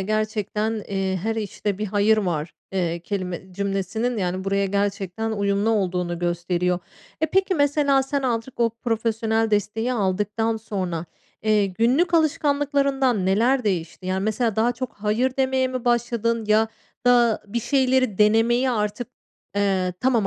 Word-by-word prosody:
gerçekten, 215 +1 -1
eee, 195 -1 -1
"Her 225 +2 -1
işte 205 -2 -3
bir 215 - -2
hayır 205 +2 +3
var", 170 -6 -2 0.2
eee, 170 -3 -1
kelime 185 0 -5
cümlesinin 200 +5 -2
yani, 185 0 -2
buraya 195 0 +1
gerçekten 200 +2 -2
uyumlu 200 +1 +1
olduğunu 180 -5 0
gösteriyor. 175 +1 0 0.4
E, 315 - +3
peki 380 +4 +1
mesela 285 -2 +3
sen 275 +1 -2
azıcık 240 0 -2
o 230 -1 +3
profesyonel 225 -1 -1
desteği 215 +4 0
aldıktan 210 +1 0
sonra, 185 -6 -3 0.4
eee, 215 -2 +3
günlük 250 - +2
alışkanlıklarından 280 - +2
neler 235 +7 +2
değişti? 185 -2 -2
Yani, 190 +1 -1
mesela 220 0 0
daha 230 +2 +3
çok 250 0 -5
"Hayır" 220 +5 0
demeye 265 -1 +1
mi 255 -2 -4
başladın 235 -1 +1
ya 215 +1 +3 0.4
da 240 -2 +4
bir 235 +4 -2
şeyleri 260 -4 +1
denemeye 225 +4 +4
artık, 210 0 -2 0.5
eee, 190 -3 +1
tamam 240 -4 +2
215 Hz, 140 wpm, -23 LUFS, 195-245 Hz, 0.5 s, da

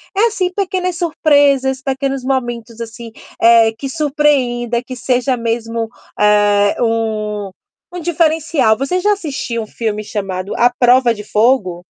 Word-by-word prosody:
É, 435 +4 +4
assim, 370 -5 -1
pequenas 365 -2 -2
surpresas, 285 -5 +2
pequenos 270 -1 -2
momentos, 240 -3 -3
assim, 230 0 -8 0.3
eh, 230 -1 +5
que 275 - -4
surpreenda, 270 -6 0
que 255 0 -8
seja 250 +1 0
mesmo, 230 -1 -3 0.3
eh, 205 -1 +3
um 215 -3 -1 0.4
um 355 - -5
diferencial. 320 -7 +1
Você 315 +9 -1
já 415 - +2
assistiu 275 - -4
um 215 - -11
filme 215 -2 -3
chamado 195 -2 -4
À 245 +1 +3
Prova 245 -1 +4
de 210 - -8
Fogo? 210 -6 +1
245 Hz, 135 wpm, -16 LUFS, 225-285 Hz, 0.4 s, eh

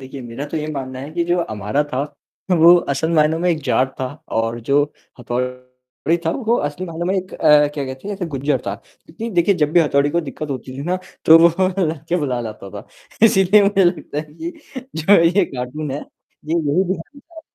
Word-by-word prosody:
देखिए, 135 +1 -9
मेरा 120 +3 -6
तो 160 - -5
ये 155 0 -3
मानना 130 -2 -5
है 140 +3 -7
कि 170 0 0
जो 175 +1 +1
अमारा 110 - -1
था, 130 - 0 0.5
वो 170 0 +7
असल 160 0 -1
मायनों 155 +1 +3
में 180 +1 0
एक 155 -3 -2
जाट 130 +1 +2
था 130 - 0 0.3
और 115 +1 -1
जो 140 +5 +2 0.4
हथौड़ी 125 +5 -3
था - - +3
वो 235 +1 0
असली 145 +5 -3
मायनो 170 0 -5
मैं 190 - +1
एक 185 0 -4
अ, 150 -2 +5
क्या 140 -2 -2
कहते 130 +8 -7
हैं 205 - -2
जैसे 180 -3 -3
गुर्जर 140 +2 0
था। - - -1
क्योंकि 225 +8 -10
देखिए 175 +3 +3
जब 150 - +1
भी 175 - +6
हथौड़ी 145 -2 +2
को 170 - +1
दिक्कत 150 0 -6
होती 130 0 -6
थी - - -4
ना, 180 +3 -1 0.3
तो 160 +1 +9
वो 170 +3 +4 0.2
लड़के 160 +2 -2
बुला 130 -6 -1
लाता 110 -4 -7
था। 105 0 -9 0.4
इसीलिए 200 0 +5
मुझे 200 -1 +3
लगता 175 -4 -1
है 150 0 -7
कि 335 - -5 0.5
जो 160 +6 +2
है 170 -4 +7
ये 185 +3 +3
कार्टून 130 +4 -4
है, 140 - -3
ये 155 +2 -9
यही 165 +3 +1
दिखाना 190 - -5
चाह 325 +1 -14
155 Hz, 215 wpm, -20 LUFS, 130-175 Hz, 0.5 s, तो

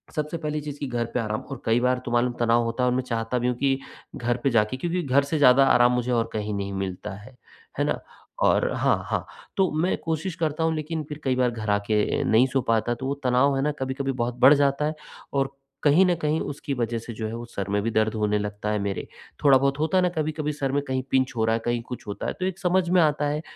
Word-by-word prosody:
सबसे 150 +2 -2
पहली 150 -2 -3
चीज़ 145 -1 -7
की 140 - -3
घर 120 -2 -1
पे - - 0
आराम 110 -1 -2
और 135 - -6
कई 115 +1 +3
बार 125 +1 +2
तो 120 - -4
मालूम 120 +1 +2
तनाव 120 0 +3
होता 115 +2 -2
है 125 - +3
और 125 - +1
मैं 130 - 0
चाहता 115 0 -2
भी 120 - 0
हूँ 125 - 0
कि, 135 0 +1 0.4
घर 120 0 -1
पे 135 - +3
जाके 115 +1 +1
क्योंकि 175 +5 -1
घर 140 0 +3
से 140 +3 -2
ज़्यादा 135 -1 +6
आराम 120 0 +5
मुझे 125 0 -1
और 115 -1 +1
कहीं 105 -1 -2
नहीं 100 -1 -3
मिलता 95 +1 -4
है। 105 +6 -13 0.4
है - - +3
ना? - - -1 0.4
और - - +3
हाँ, - - +1
हाँ, - - -1 0.3
तो 190 -2 +3
मैं 180 - +1
कोशिश 165 +2 -2
करता 160 -1 -1
हूँ, 160 0 +1
लेकिन 155 +1 -3
फिर 150 0 -6
कई 130 -1 +1
बार 125 -1 +2
घर 110 -2 -5
आ 100 - +4
के 105 -1 +1
नहीं 115 +4 +4
सो 135 0 0
पाता, 115 0 +1
तो 130 - -7
वो 135 - 0
तनाव 130 +2 +3
है - - +1
ना 150 - +1
कभी-कभी 135 +1 -2
बहुत 120 -2 -2
बढ़ 130 +3 +8
जाता 140 +1 +1
है 155 +1 -1 0.4
और 135 0 0 0.3
कहीं 155 +6 +5
न 180 - +3
कहीं 155 +1 +1
उसकी 145 0 -4
वजह 120 -2 -1
से 115 +1 -8
जो 110 0 -4
है, 110 - -6
वो 120 +1 -6
सर 100 -4 -5
में 100 0 +1
भी 115 - -1
दर्द 110 0 +1
होने 105 -1 +1
लगता 105 0 -4
है 105 - 0
मेरे, 100 -1 -3 0.4
थोड़ा 140 -2 +7
बहुत 140 +2 0
होता 160 +5 +1
है - - +5
ना 180 - +3
कभी-कभी 155 -1 -1
सिर 140 -2 -2
में 145 +1 +1
कहीं 130 0 -1
पिंच 130 0 +2
हो 110 - +2
रहा 110 - +2
है, - - -1
कहीं 120 0 0
कुछ 125 -1 -8
होता 100 - -4
है। - - -2
तो 185 - -1
एक 190 0 -3
समझ 185 -1 +2
में 180 0 +5
आता 150 -2 +2
है, 150 +1 -1
130 Hz, 270 wpm, -25 LUFS, 115-150 Hz, 0.4 s, बढ़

